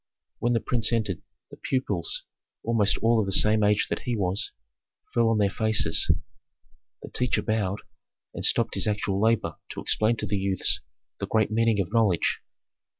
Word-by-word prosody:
When 120 +1 +1
the 115 - +2
prince 115 -2 +1
entered, 110 -6 -1 0.3
the - - -11
pupils, 100 -10 -2 0.4
almost 110 -4 +2
all 115 0 +4
of 105 - 0
the - - -2
same 105 +2 +5
age 105 0 +2
that - - -2
he 120 -2 -3
was, 95 0 0 0.6
fell 115 -1 +3
on 115 - +2
their 105 -1 +3
faces. 110 -6 +1 0.9
The - - -9
teacher 125 -1 0
bowed, 105 -2 -1 0.5
and - - -6
stopped - - +2
his - - 0
actual 100 -2 -1
labor 110 -7 +1
to - - -6
explain 110 +2 +1
to 110 - -3
the 100 0 -1
youths 95 -1 +1 0.4
the - - -3
great 110 -1 +1
meaning 115 -1 +2
of 95 +1 -2
knowledge. 110 -7 +2
110 Hz, 170 wpm, -26 LUFS, 100-115 Hz, 0.9 s, same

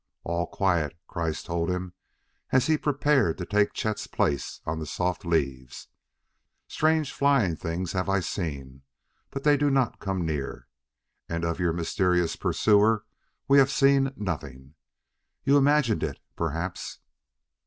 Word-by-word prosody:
"All 85 0 -1
quiet," 85 -5 0
Kreiss 80 -3 -3
told 85 0 -2
him 90 0 -3 0.6
as 130 -1 +3
he 155 - +3
prepared 145 - +1
to 90 - -4
take 105 +2 +2
Chet's 110 -1 -2
place 70 -1 -1
on 80 +1 -2
the 80 - -5
soft 90 +3 -2
leaves; 70 -6 -2 0.8
"strange, 155 -2 +1
flying 135 - +2
things 85 +2 -3
have 95 0 -1
I 100 0 +3
seen, 70 -8 -5 0.5
but 135 - -6
they 150 -1 +5
do 145 0 +2
not 135 -3 +1
come 95 -3 -2
near. 75 -4 -4 0.6
And 85 0 -2
of 85 0 -2
your 90 -2 +2
mysterious 90 +1 +1
pursuer 105 0 +3 0.4
we 140 0 +6
have 135 0 +5
seen 135 -1 +3
nothing. 75 - -5 0.7
You 140 - +4
imagined 145 -5 +3
it, - - -2 0.2
perhaps." 85 +2 -3
90 Hz, 140 wpm, -26 LUFS, 80-135 Hz, 0.8 s, we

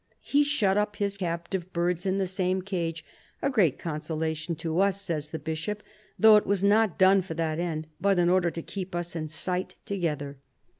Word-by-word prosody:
He 290 +1 +3
shut 220 -10 +2
up 210 0 -1
his 200 -1 -1
captive 175 0 -3
birds 175 +2 0
in 190 +1 +1
the 195 - +1
same 185 0 -1
cage 165 -4 -3
— - - -29
" - - -40
a 275 - +2
great 185 - +3
consolation 160 0 -3
to 165 +1 -2
us," 200 0 +2
says 160 -6 -3
the 160 - -4
Bishop, 160 +7 -4 0.2
" 210 - -32
though 220 -1 +8
it 210 - 0
was 200 -1 +1
not 210 -1 +3
done 190 +1 +6
for 175 -3 -6
that 160 -1 -1
end, 160 -3 -2
but 200 -1 +2
in 175 -1 +3
order 180 -1 +3
to 165 0 -6
keep 190 -2 -6
us 175 0 -4
in 155 -1 -3
sight 180 +4 -2
together." 150 -8 -3
180 Hz, 210 wpm, -27 LUFS, 165-195 Hz, 0.2 s, though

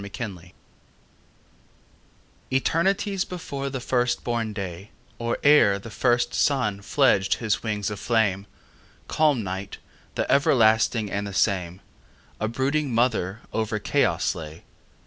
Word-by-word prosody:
Mother 115 +4 -5
Night 90 -2 -14 1.9
ETERNITIES 190 +8 +1
before 140 -6 -5
the 135 -1 -4
first 125 0 0
born 115 -2 -2
day, 95 -1 -6 0.3
Or 115 0 -1
ere 145 -9 +6
the 110 +3 -10
first 120 0 +1
sun 115 -8 +1
fledged 100 -5 +2
his 110 -3 -1
wings 105 -2 -2
of 105 - -6
flame, 105 -4 +1 0.6
Calm 150 -7 +2
Night, 95 +1 -5 0.4
the - - 0
everlasting 110 -5 +3
and 100 0 -2
the 100 - -7
same,A 95 +2 -3
brooding 135 +4 -1
mother 115 -4 0
over 110 -1 -1
chaos 105 - +1
lay. 80 0 -9
110 Hz, 120 wpm, -25 LUFS, 100-130 Hz, 1.9 s, ere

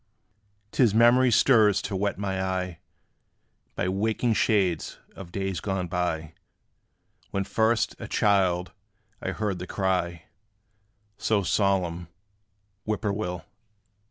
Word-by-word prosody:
'T - - 0
is 110 -5 +4
memory 120 +3 +6
stirs 110 -4 +5
to 100 - -4
wet 100 +1 -1
my 95 -1 -2
eye 90 -3 -3 1.0
By - - -1
waking 110 +5 0
shades 100 -6 +1 0.2
of 90 -3 -10
days 95 -1 -2
gone 95 -3 -2
by, 85 -2 -2 1.0
When 100 - -1
first, 110 +2 +1
a - - -6
child, 95 -3 +2 0.5
I - - -3
heard 105 -4 -2
the 90 - -6
cry 90 -4 -1 1.0
So 105 -3 +1
solemn, 90 -4 0 0.8
"Whip 110 -1 -2
poor 105 - +1
will." 90 -4 -4
95 Hz, 120 wpm, -26 LUFS, 90-105 Hz, 1.0 s, memory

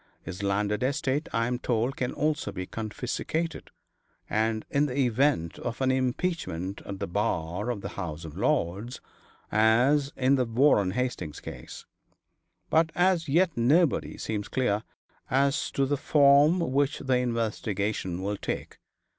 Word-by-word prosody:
His 90 - -7
landed 100 +1 0
estate 135 +2 0
I 115 0 +1
am 120 +1 -2
told 120 +2 0
can 125 - -2
also 150 0 -1
be 95 -1 -5
confiscated, 125 - -4 0.6
in 110 0 +1
the 140 -2 +1
event 130 - +1
of 120 0 -4
an 130 -1 +2
impeachment 130 - -2
at 100 - -5
the 100 - -3
bar 95 0 -2
of 115 -5 -3
the - - -5
House 85 -4 -6
of 80 - -9
Lords, 100 +9 -1 0.5
as 125 +7 +3
in 135 +2 +3
the 130 - +2
Warren 115 -4 +3
Hastings 95 - -3
case. - - -9 0.9
But 160 +1 +3
as 175 -3 +2
yet 170 +3 +3
nobody 145 +7 +2
seems 105 -2 -3
clear 115 -6 0 0.5
as 140 +2 +1
to 135 - +2
the 145 +2 0
form 145 +4 +5
which 140 +1 +1
the 130 -2 +1
investigation 105 -6 -2
will 100 +1 -2
take. - - -5
125 Hz, 140 wpm, -27 LUFS, 105-140 Hz, 0.9 s, form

